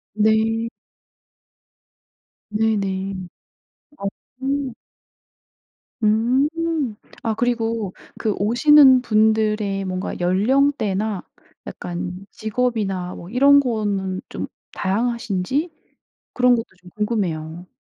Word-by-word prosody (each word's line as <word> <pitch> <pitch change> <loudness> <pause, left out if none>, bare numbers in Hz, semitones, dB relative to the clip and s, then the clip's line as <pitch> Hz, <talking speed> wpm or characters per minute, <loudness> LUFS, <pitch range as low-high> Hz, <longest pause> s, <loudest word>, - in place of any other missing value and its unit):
네. 220 +1 +2 1.8
네네. 200 -3 0 0.9
어음. 265 +6 -4 1.3
음. 235 +7 +3 0.7
아 225 -1 0
그리고 230 -4 -1 0.3
그 215 -3 0
오시는 260 +5 +6
분들의 215 -3 +2
뭔가 185 0 -4
연령대나 210 0 +1 0.4
약간 180 +2 -6
직업이나 210 -6 -2
뭐 170 - -10
이런 280 +5 +6
거는 205 -7 -1
좀 - - -5 0.3
다양하신지 235 - -1 0.6
그런 250 0 +4
것도 230 -1 -2 0.2
좀 180 - -14
궁금해요. 180 -6 -2
220 Hz, 165 characters per minute, -22 LUFS, 195-245 Hz, 1.8 s, 오시는